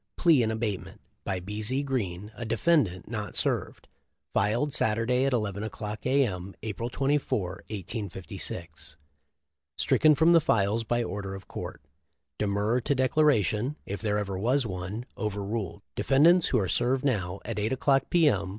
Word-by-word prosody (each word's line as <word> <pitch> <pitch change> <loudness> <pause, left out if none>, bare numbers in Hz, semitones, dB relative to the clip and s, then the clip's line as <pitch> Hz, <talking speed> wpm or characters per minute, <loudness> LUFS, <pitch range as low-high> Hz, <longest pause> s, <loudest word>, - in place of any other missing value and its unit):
Plea 165 -7 +5
in 110 - +1
abatement 110 -3 -3 0.2
by 95 - -2
B. 105 +4 -5
Z. 130 +6 0
Green, 105 -7 -3
a 120 - -7
defendant 115 - +1
not - - -5
served, - - -2 0.5
filed 120 +8 +1
Saturday 115 +4 +2
at 135 - +1
11 105 -4 -1
o'clock 105 +1 -5
A. 135 +1 +4
M., 95 -2 -5
April 110 +2 -3
24, 140 -3 0 0.3
1856, 90 -6 -6 0.8
stricken 155 0 +4
from 160 +3 +5
the 165 - +6
files 110 -3 +2
by 120 +2 0
order 95 0 -4
of 95 - -11
court. - - -7 0.6
De 105 - +1
murrer 105 +5 +1
to 140 +4 0
declaration, 130 - +2
if 100 - -5
there 105 -2 0
ever 100 -2 -2
was 125 +5 +2
one, 95 +4 -5
over 105 -2 -2
ruled. 100 -3 -4
Defendants 165 +6 +5
who 125 - +2
are 100 -5 +1
served 130 +7 +1
now, 100 -8 0
at - - -3
8 105 +2 0
o'clock, 135 0 +2
P. 170 -3 +4
M. 100 -8 +1
110 Hz, 160 wpm, -28 LUFS, 100-130 Hz, 0.8 s, the